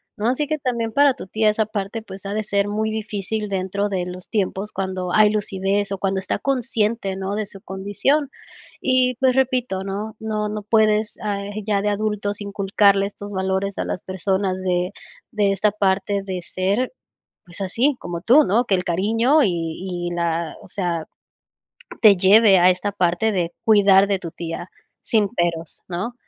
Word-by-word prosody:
¿no?, 220 Hz, -1 st, -2 dB
así 260 Hz, +4 st, 0 dB
que 310 Hz, +1 st, -1 dB
también 235 Hz, -4 st, -2 dB
para 285 Hz, +1 st, +5 dB
tu 190 Hz, -, -10 dB
tía 215 Hz, +2 st, +2 dB
esa 215 Hz, +1 st, +1 dB
parte, 210 Hz, +1 st, -4 dB
pues, 195 Hz, -2 st, -9 dB
ha 200 Hz, -, -3 dB
de 215 Hz, +1 st, -1 dB
ser 200 Hz, -1 st, 0 dB
muy 215 Hz, +1 st, -1 dB
difícil 215 Hz, -1 st, -3 dB
dentro 195 Hz, +1 st, -1 dB
de 185 Hz, -3 st, -2 dB
los 180 Hz, 0 st, -8 dB
tiempos 205 Hz, -1 st, -2 dB
cuando 185 Hz, -1 st, -3 dB
hay 215 Hz, -1 st, +6 dB
lucidez, 200 Hz, -1 st, -1 dB
o 195 Hz, -, -2 dB
cuando 190 Hz, 0 st, -1 dB
está -, -, -2 dB
consciente, 230 Hz, -7 st, -1 dB
¿no?, 195 Hz, +1 st, -3 dB
de 215 Hz, 0 st, -2 dB
su 195 Hz, -1 st, -9 dB
condición. 205 Hz, +11 st, 0 dB, 0.5 s
Y, 255 Hz, -1 st, +2 dB
pues, 260 Hz, -2 st, +3 dB
repito, 250 Hz, -7 st, 0 dB
¿no?, 205 Hz, +3 st, -5 dB
no 215 Hz, -1 st, -2 dB
no 210 Hz, 0 st, -4 dB
puedes, 215 Hz, 0 st, +2 dB
ah, 205 Hz, -2 st, -2 dB, 0.2 s
ya 205 Hz, -2 st, +2 dB
de 210 Hz, -, 0 dB
adultos 205 Hz, -1 st, -2 dB
inculcarle 200 Hz, 0 st, +2 dB
estos 205 Hz, 0 st, -9 dB
valores 190 Hz, +1 st, -1 dB
a -, -, -1 dB
las -, -, -4 dB
personas 190 Hz, 0 st, -1 dB
de 180 Hz, 0 st, 0 dB, 0.4 s
de 205 Hz, -2 st, +2 dB
esta 205 Hz, +1 st, +2 dB
parte 200 Hz, 0 st, 0 dB
de 190 Hz, -2 st, -4 dB
ser, 195 Hz, -, -1 dB, 0.5 s
pues 175 Hz, +2 st, -9 dB
así, 230 Hz, +10 st, +1 dB
como 170 Hz, -1 st, -5 dB
tú, 270 Hz, +9 st, +6 dB
¿no?, 220 Hz, +6 st, +2 dB
que 195 Hz, -, +2 dB
el 180 Hz, -, -3 dB
cariño 225 Hz, -, +2 dB
y 175 Hz, -2 st, -2 dB
y -, -, -5 dB
la 170 Hz, -1 st, -2 dB
o -, -, -14 dB
sea, 175 Hz, -4 st, -2 dB, 1.0 s
te 210 Hz, -3 st, +8 dB
lleve 195 Hz, +2 st, +6 dB
a 180 Hz, +1 st, +6 dB
esta 185 Hz, +3 st, -1 dB
parte 185 Hz, +3 st, +1 dB
de 175 Hz, -3 st, -1 dB
cuidar 200 Hz, -3 st, +6 dB
de 200 Hz, -1 st, +1 dB
tu 170 Hz, -, -6 dB
tía, 170 Hz, +1 st, -6 dB, 0.3 s
sin 215 Hz, -3 st, +2 dB
peros, 165 Hz, -2 st, -2 dB
¿no?, 185 Hz, +7 st, -4 dB
200 Hz, 180 wpm, -22 LUFS, 190-215 Hz, 1.0 s, te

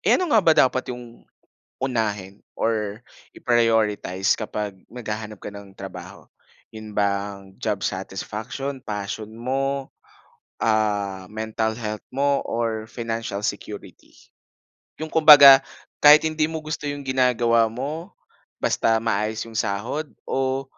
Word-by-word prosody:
Eh, -, -, +4 dB
ano 360 Hz, -4 st, -2 dB
nga 220 Hz, -, +6 dB
ba 165 Hz, -3 st, +5 dB
dapat 130 Hz, 0 st, +3 dB
yung 120 Hz, -1 st, -13 dB, 0.6 s
unahin 105 Hz, -6 st, -2 dB, 0.2 s
or 110 Hz, -1 st, -1 dB, 0.3 s
i-prioritize 110 Hz, -5 st, +1 dB
kapag 105 Hz, -3 st, -4 dB
naghahanap 110 Hz, -3 st, -6 dB
ka -, -, -6 dB
ng 100 Hz, -1 st, -11 dB
trabaho, 95 Hz, 0 st, -9 dB, 0.5 s
yun 110 Hz, -1 st, -9 dB
bang 100 Hz, -1 st, -2 dB
job -, -, -1 dB
satisfaction, 135 Hz, +5 st, -5 dB
passion 105 Hz, +1 st, -5 dB
mo, 135 Hz, +3 st, -2 dB, 0.8 s
ah, 105 Hz, -4 st, 0 dB
mental 110 Hz, 0 st, -2 dB
health 110 Hz, -2 st, -5 dB
mo, 140 Hz, +1 st, +1 dB
or 115 Hz, -2 st, -2 dB
financial 115 Hz, -3 st, -4 dB
security? 105 Hz, 0 st, -6 dB, 0.9 s
Yung 160 Hz, 0 st, -6 dB
kumbaga 145 Hz, -4 st, +9 dB, 0.4 s
kahit 150 Hz, +1 st, +8 dB
hindi 155 Hz, -1 st, 0 dB
mo 160 Hz, -, -3 dB
gusto 155 Hz, -1 st, -5 dB
yung 145 Hz, -1 st, -7 dB
ginagawa 120 Hz, -3 st, +3 dB
mo, 150 Hz, -, -5 dB, 0.5 s
basta 115 Hz, 0 st, +2 dB
maayos 110 Hz, 0 st, -1 dB
yung 115 Hz, -, -12 dB
sahod 115 Hz, +9 st, -2 dB, 0.2 s
o 135 Hz, 0 st, -1 dB
115 Hz, 120 wpm, -23 LUFS, 105-135 Hz, 0.9 s, kumbaga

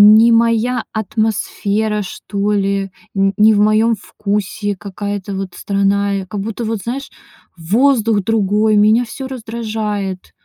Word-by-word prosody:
не 230 Hz, +2 st, +6 dB
моя 230 Hz, +2 st, +2 dB
атмосфера, 215 Hz, -1 st, -1 dB
что 200 Hz, +1 st, -3 dB
ли, 195 Hz, -1 st, 0 dB, 0.2 s
н 195 Hz, 0 st, +2 dB
не 215 Hz, +1 st, +6 dB
в 205 Hz, -, +2 dB
моем 215 Hz, +2 st, +3 dB
вкусе 205 Hz, 0 st, -3 dB
какая-то 200 Hz, +1 st, -5 dB
вот 190 Hz, -2 st, -5 dB
страна. 200 Hz, 0 st, 0 dB
Я 195 Hz, -1 st, -2 dB
как 195 Hz, +2 st, -5 dB
будто 225 Hz, +2 st, -4 dB
вот, 220 Hz, -3 st, -2 dB
знаешь, 265 Hz, +4 st, -4 dB, 0.5 s
воздух 220 Hz, +4 st, +2 dB
другой, 215 Hz, 0 st, +2 dB
меня 215 Hz, +4 st, +4 dB
всё 260 Hz, +4 st, -7 dB
раздражает. 220 Hz, -6 st, -4 dB
210 Hz, 130 wpm, -17 LUFS, 200-225 Hz, 0.5 s, не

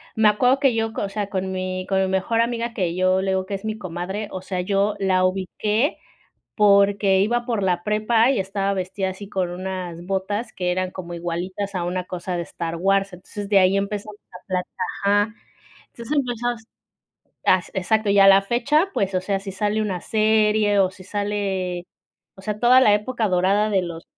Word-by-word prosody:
me 220 Hz, -1 st, +5 dB
acuerdo 250 Hz, +6 st, +3 dB
que 270 Hz, -3 st, +3 dB
yo, 225 Hz, 0 st, -1 dB
o 200 Hz, -, -2 dB
sea, 205 Hz, 0 st, -3 dB
con 190 Hz, -1 st, -2 dB
mi 185 Hz, 0 st, -3 dB
con 195 Hz, -1 st, +1 dB
mi 190 Hz, -, +1 dB
mejor 190 Hz, +4 st, 0 dB
amiga, 235 Hz, 0 st, -1 dB
que 180 Hz, -6 st, -1 dB
yo, 185 Hz, +1 st, +2 dB
le 190 Hz, 0 st, -1 dB
digo 190 Hz, 0 st, 0 dB
que 200 Hz, -, -4 dB
es 195 Hz, +2 st, -8 dB
mi 215 Hz, 0 st, -3 dB
comadre, 190 Hz, +2 st, -5 dB
o 185 Hz, -, -5 dB
sea, 185 Hz, -1 st, -3 dB
yo 200 Hz, +2 st, +1 dB
la 185 Hz, -1 st, +2 dB
ubiqué 210 Hz, -, 0 dB, 0.6 s
porque 200 Hz, -1 st, +4 dB
iba 240 Hz, +4 st, +1 dB
por 230 Hz, -5 st, -1 dB
la 180 Hz, -2 st, +1 dB
prepa 215 Hz, +4 st, +2 dB
y 275 Hz, -, +1 dB
estaba 195 Hz, +1 st, -1 dB
vestida 190 Hz, +1 st, -2 dB
así 195 Hz, +1 st, -9 dB
con 185 Hz, -3 st, -2 dB
unas 180 Hz, -2 st, -5 dB
botas 200 Hz, +4 st, -2 dB
que 180 Hz, -1 st, -2 dB
eran 185 Hz, +1 st, -1 dB
como 175 Hz, -2 st, -7 dB
igualitas 180 Hz, +4 st, -4 dB
a 180 Hz, -2 st, -1 dB
una 180 Hz, +1 st, -2 dB
cosa 180 Hz, 0 st, -4 dB
de 170 Hz, -, -2 dB
Star 170 Hz, 0 st, -5 dB
Wars. 195 Hz, +2 st, +1 dB
Entonces 200 Hz, +3 st, -8 dB
de 200 Hz, -1 st, +5 dB
ahí 190 Hz, +1 st, +4 dB
empezamos 205 Hz, +1 st, -4 dB
a 180 Hz, -, -13 dB
plat 185 Hz, -1 st, -2 dB, 0.4 s
ajá. 205 Hz, +2 st, +2 dB, 0.5 s
Entonces 235 Hz, +6 st, -4 dB
empezamos, 240 Hz, -3 st, -2 dB, 0.8 s
as 185 Hz, -2 st, +3 dB
exacto, 215 Hz, +3 st, +1 dB
y 200 Hz, 0 st, +5 dB
a 195 Hz, -, +8 dB
la 195 Hz, 0 st, +7 dB
fecha 280 Hz, -, +1 dB
pues, 195 Hz, -1 st, -1 dB
o -, -, +1 dB
sea, 195 Hz, +1 st, -2 dB
si 195 Hz, 0 st, -7 dB
sale 210 Hz, +3 st, -1 dB
una 190 Hz, -4 st, -2 dB
serie, 215 Hz, -1 st, +2 dB
o 190 Hz, -2 st, +3 dB
si 185 Hz, 0 st, -14 dB
sale, 195 Hz, -3 st, -3 dB, 0.5 s
o -, -, -12 dB
sea, 210 Hz, +1 st, -4 dB
toda 250 Hz, +2 st, +6 dB
la 210 Hz, -5 st, +5 dB
época 220 Hz, +2 st, -1 dB
dorada 190 Hz, +3 st, +2 dB
de 195 Hz, -3 st, +1 dB
los 170 Hz, -2 st, -6 dB
195 Hz, 200 wpm, -22 LUFS, 185-215 Hz, 0.8 s, a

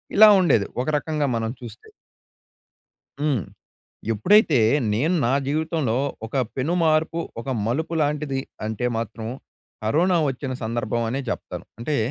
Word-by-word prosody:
ఇలా 215 Hz, +1 st, +9 dB
ఉండేది. 125 Hz, -, +3 dB, 0.2 s
ఒక 130 Hz, -, -4 dB
రకంగా 150 Hz, -1 st, -1 dB
మనం 115 Hz, 0 st, -1 dB
చూస్తే. 120 Hz, -, -10 dB, 1.3 s
హ్మ్. 140 Hz, -, +1 dB, 0.7 s
ఎప్పుడైతే 155 Hz, -, +4 dB, 0.3 s
నేను 150 Hz, +12 st, +1 dB
నా 120 Hz, -, +2 dB
జీవితంలో 155 Hz, -5 st, 0 dB, 0.3 s
ఒక 115 Hz, -, -13 dB, 0.2 s
పెనుమార్పు, 160 Hz, +2 st, +1 dB, 0.2 s
ఒక 115 Hz, -, -9 dB, 0.2 s
మలుపు 160 Hz, +8 st, -1 dB
లాంటిది 145 Hz, -2 st, -1 dB, 0.3 s
అంటే, 110 Hz, +3 st, -3 dB
మాత్రం 115 Hz, 0 st, -5 dB, 0.6 s
కరోనా 170 Hz, +11 st, +3 dB
వచ్చిన 130 Hz, 0 st, -3 dB
సందర్భం 115 Hz, 0 st, -1 dB
అనే 135 Hz, +4 st, -2 dB
చెప్తాను. -, -, -5 dB
అంటే, 145 Hz, +5 st, -1 dB
140 Hz, 120 wpm, -23 LUFS, 115-160 Hz, 1.3 s, ఇలా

